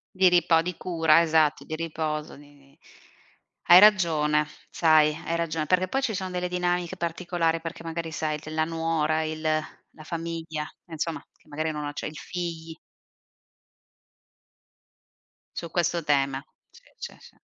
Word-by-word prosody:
Di 185 0 +5
ripa 175 -2 +4
o - - +4
di 180 +1 -4
cura, 165 -2 +3
esatto, 155 -2 +2
di 155 - -8
riposo, 155 -2 -3
di 145 0 -17
di 140 +2 -24 0.9
hai 175 +1 +10
ragione, 160 -7 +4 0.2
sai. 155 -2 +4
Hai 170 0 -1
ragione, 160 -2 -2
perché 185 0 +2
poi 270 +8 -1
ci 230 -5 -1
sono 185 -1 -3
delle 180 0 -2
dinamiche 180 -1 -1
particolari 170 -1 -1
perché 165 0 -7
magari 165 0 -4
sai 155 -1 -2
della 155 +1 -2
nuora, 160 -1 0
il 155 0 -4 0.5
la 155 - -13
famiglia, 165 -2 -4 0.2
insomma 165 0 -4
che - - -31
magari 155 +1 -2
non 150 -1 -4
acce 145 0 -4
i 155 - -9
figli. 165 -2 -5 2.8
Su 170 - -5
questo 170 0 0
tema. 140 -2 +1 0.3
Si, - - -19 0.2
sì, - - -8
si. - - -17
165 Hz, 145 wpm, -26 LUFS, 155-170 Hz, 2.8 s, hai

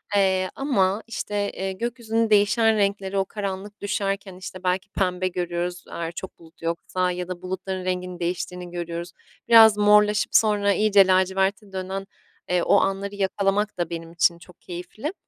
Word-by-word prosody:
eee, 190 -2 +2
ama, 210 -7 +1
işte, 205 -2 -3
eee, 190 0 -4
gökyüzünün 230 0 -1
değişen 215 +2 +4
renkleri 200 -1 0
o 195 - +2
karanlık 200 0 -6
düşerken, 195 -1 -2
işte, 185 0 -9
belki 185 +2 -1
pembe 185 -1 -1
görüyoruz 175 0 -3
eğer 165 0 -4
çok 185 +2 -8
bulut 165 0 -19
yoksa 180 +2 -1
ya 180 0 -4
da 180 -1 -6
bulutların 185 0 -4
renginin 180 -1 -3
değiştiğini 180 0 -4
görüyoruz. 170 0 -5 0.4
Biraz 225 -2 +8
morlaşıp 210 0 +4
sonra 205 -2 +4
iyice 200 -1 +5
laciverte 190 +2 +1
dönen, 190 +1 -4 0.4
eee, 180 -1 +2
o - - +4
anları 195 +1 -1
yakalamak 200 +1 0
da 175 -2 -2
benim 165 -1 -6
için 170 0 +2
çok 180 0 -17
keyifli. 185 - -6
190 Hz, 155 wpm, -24 LUFS, 180-205 Hz, 0.4 s, Biraz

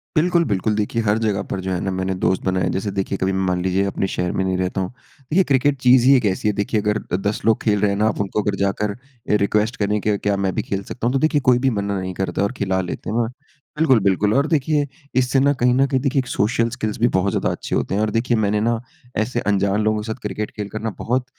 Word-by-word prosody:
बिल्कुल, 170 +2 +3
बिल्कुल। 105 -2 0
देखिए 105 +2 -1
हर 105 -1 +2
जगह 105 -3 0
पर 95 - -2
जो 95 - -1
है 90 - -1
ना 95 - -2
मैंने 95 0 -2
दोस्त 95 - +2
बनाए। 95 0 +1
जैसे 95 +2 -2
देखिए 95 0 -2
कभी 95 +1 0
मान 90 -1 0
लीजिए 95 +1 +1
अपने 95 0 -1
शहर 90 -1 -2
में 95 - -1
नहीं 95 -1 0
रहता 95 +1 -1
हूँ। 95 - -2 0.3
देखिए 155 +8 +1
क्रिकेट 135 +1 +3
चीज़ 125 0 +5
ही 135 - +8
एक 125 - +2
ऐसी 100 +1 0
है 105 - +2
देखिए 105 +1 -1
अगर 105 0 0 0.3
10 105 - -1
लोग 115 -1 +3
खेल 105 -2 +2
रहे 105 - +3
हैं 100 - -1
ना 105 +1 +2
आप 110 - -1
उनको 100 +2 -1
अगर 100 -1 -1
जाकर 100 +1 0 0.3
ये 105 - +4
रिक्वेस्ट 105 +3 +1
करें 105 0 0
के 105 0 +1
क्या 100 0 0
मैं 95 -1 0
भी - - +1
खेल 100 0 -3
सकता 120 - -4
हूँ, 125 - 0
तो 135 - +2
देखिए 155 0 +2
कोई 125 -2 +4
भी 135 - +2
मना 100 -4 -2
नहीं 95 0 -4
करता 95 +2 -2
और 100 - 0
खिला 95 -2 0
लेते 90 - -5
हैं। 115 +1 0 0.5
बिल्कुल, 135 -7 +4
बिल्कुल, 100 +2 +2
और 140 +2 +2
देखिए 150 -2 +1 0.3
इससे 130 +1 +2
ना 140 +2 +4
कहीं 125 0 +3
न 135 +2 +4
कहीं 130 0 +1
देखिए 135 0 +1
एक 130 - -2
सोशियल 115 +2 +1
स्किल्स 110 -3 -3
भी 120 - +4
बहुत 95 -3 +1
ज़्यादा - - 0
अच्छे - - -4
होते - - -1
हैं। 105 - +1
और 110 - +1
देखिए 115 +1 +1
मैंने 105 -1 +1
ना 115 0 +1 0.4
ऐसे 120 +3 0
अनजान 100 +1 +1
लोगों 110 0 +1
के 105 - -7
साथ 110 +3 -4
क्रिकेट 105 +1 -4
खेल 105 -1 -4
कर 110 - -5
ना 115 - -1
बहुत 125 +2 0
105 Hz, 270 wpm, -21 LUFS, 100-125 Hz, 0.5 s, ही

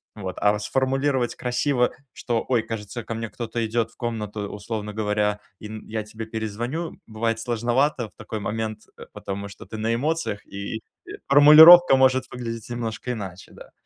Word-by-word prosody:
Вот. 95 -4 -6
А, 105 0 +3
фс 105 - -6
сформулировать 135 -1 0
красиво, 125 0 0 0.2
что, 115 -2 -2
ой, 125 -3 +2
кажется, 110 +1 -6
ко 115 - -5
мне 115 0 -4
кто-то 115 0 -3
идет 115 0 -1
в - - -26
комнату, 105 -3 -4
условно 105 0 -5
говоря, 105 -1 0 0.2
и, 105 - -8
м, 110 0 -9
я 110 0 -3
тебе 110 +1 -8
перезвоню, 115 +9 -4
м, - - -18
бывает 115 0 -2
сложновато 120 +2 0
в - - -33
такой 110 - -6
момент, 110 +1 -4 0.2
э, - - -10
потому 100 +1 -6
что 100 - -12
ты 110 - -8
на 110 +1 0
эмоциях, 150 -3 -2
и, 100 +3 -6 0.2
э, - - -10 0.2
формулировка 150 +3 +9
может 130 0 +3
выглядеть 115 -2 -6
немножко 120 0 -4
иначе, 95 -6 -7
да. - - -14
115 Hz, 180 wpm, -24 LUFS, 105-125 Hz, 0.2 s, формулировка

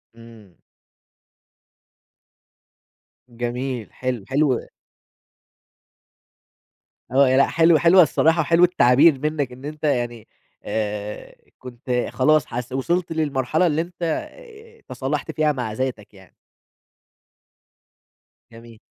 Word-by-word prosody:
إمم. 115 -5 -16 2.7
جميل 120 0 -4
حلو، 125 -4 -4
حلو 135 -2 +1 2.5
آه، 135 +1 +4
ي 130 - +2
لأ، 140 - +4
حلوة، 165 -1 +3
حلوة، 175 +2 +6
الصراحة 160 +3 +2
حلو 170 +3 +3
التعبير 150 -3 +4
منّك 150 -2 -2
إن 130 +2 -12
أنت 150 +1 -8
يعني 120 -6 -2 0.4
آآ، 105 -1 -5 0.2
كنت 125 0 -4
خلاص 150 +1 +2
حس 125 +1 -6
وصلت 170 +7 -1
للمرحلة 155 +1 0
اللي 155 0 0
أنت 175 +1 -11
آآ، 455 - -6
تصالحت 145 +3 -4
فيها 155 0 +1
مع 125 -6 -4
ذاتك 125 -4 -5
يعني. 95 -2 -19 2.2
جميل. 115 -1 -15
135 Hz, 100 wpm, -22 LUFS, 120-160 Hz, 2.7 s, حلوة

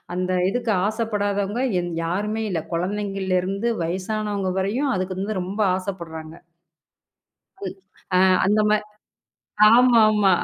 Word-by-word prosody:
அந்த 185 0 -1 0.2
இதுக்கு 235 +2 -1 0.2
ஆசைப்படாதவங்க 210 0 -1 0.2
எந் 175 0 -4
யாருமே 210 +6 -2
இல்ல. 170 -4 -1
குழந்தைங்களருந்து 195 +2 -1
வயசானவங்க 195 +2 -2
வரையும் 240 +9 0
அதுக்கு 185 0 -3
வந்து 200 0 -2
ரொம்ப 190 +4 -6 0.2
ஆசைப்படுறாங்க. 165 -4 -7 1.3
ம். - - -5 0.4
அ - - +5 0.3
அந்த 210 +2 +3
மா 215 - +5 1.0
ஆமாமா. 220 -4 +5
200 Hz, 105 wpm, -23 LUFS, 185-215 Hz, 1.3 s, அ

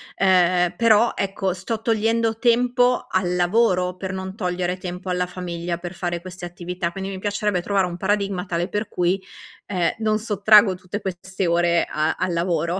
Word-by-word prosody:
Ehm, 180 -2 +3
però, 230 0 +4
ecco 195 -1 -1
sto 215 +5 -4
togliendo 225 0 +1
tempo 245 +1 +2
al 180 -1 0
lavoro 180 -1 +2
per 190 0 -5
non 190 +1 -5
togliere 180 -2 -2
tempo 180 +1 -6
alla 180 0 0
famiglia 175 -1 -4
per 175 +1 -7
fare 175 -1 -3
queste 185 0 -10
attività, 175 0 -4
quindi 195 +2 -5
mi 190 - -6
piacerebbe 205 -2 -1
trovare 195 0 +1
un 175 -1 -5
paradigma 200 -1 -1
tale 175 0 -1
per 210 +2 -3
cui, 180 +2 0 0.5
ehm, 180 -4 +1
non 215 -1 +1
sottraggo 210 -2 +5
tutte 185 +3 -6
queste 190 0 -4
ore 170 0 +2
a 155 +1 0
al 180 - -1
lavoro. 170 +1 0
185 Hz, 170 wpm, -22 LUFS, 175-205 Hz, 0.5 s, sottraggo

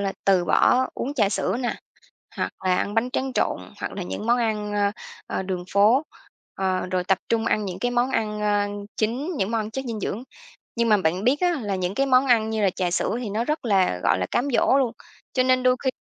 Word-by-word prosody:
là 195 -1 -1
từ 190 -3 +4
bỏ 250 +10 +4
uống 280 +3 -3
trà 215 -8 +3
sữa 200 - -1
nè, 245 - -1 0.6
hoặc - - -1
là 185 -1 +3
ăn 205 - -1
bánh 230 +3 +1
tráng 265 0 -2
trộn, - - 0 0.2
hoặc - - -4
là 195 - -5
những 205 - -5
món 240 +1 +3
ăn, 215 -3 -1
ơ, 205 -1 +2 0.4
ờ, - - -2
đường 185 -2 -3
phố, 215 +8 +5 0.5
ờ, 190 -1 -1
rồi 185 -1 0
tập 190 +1 +2
trung 230 -1 +1
ăn 215 -2 +1
những 185 -2 -5
cái 245 - 0
món 245 +1 +1
ăn, 210 -4 -1
ơ, 205 -1 +1 0.3
chính, 255 +11 -1
những 195 -1 -1
món 225 -1 +1
ăn 215 +1 -6
chất 265 +4 -4
dinh 230 -3 -4
dưỡng. 210 +3 -3 0.5
Nhưng 235 0 +1
mà 215 - +6
bạn 185 +1 0
biết 270 +4 +3
á, 355 -1 +3
là 205 -2 -2
những 185 0 -2
cái 275 +5 +1
món 260 0 +4
ăn 225 -3 +3
như 220 -1 -1
là 195 - +4
trà 180 -1 -2
sữa 180 - 0
thì 220 - -4
nó 220 +3 -1
rất 305 +2 -2
là, 190 - +2
gọi - - +3
là, 90 - -1
cám 255 +4 0
dỗ - - +4
luôn, 255 -4 +1 0.4
cho 255 - +2
nên 255 0 +3
đôi 255 0 +4
khi 260 - +3
220 Hz, 245 wpm, -24 LUFS, 195-250 Hz, 0.6 s, mà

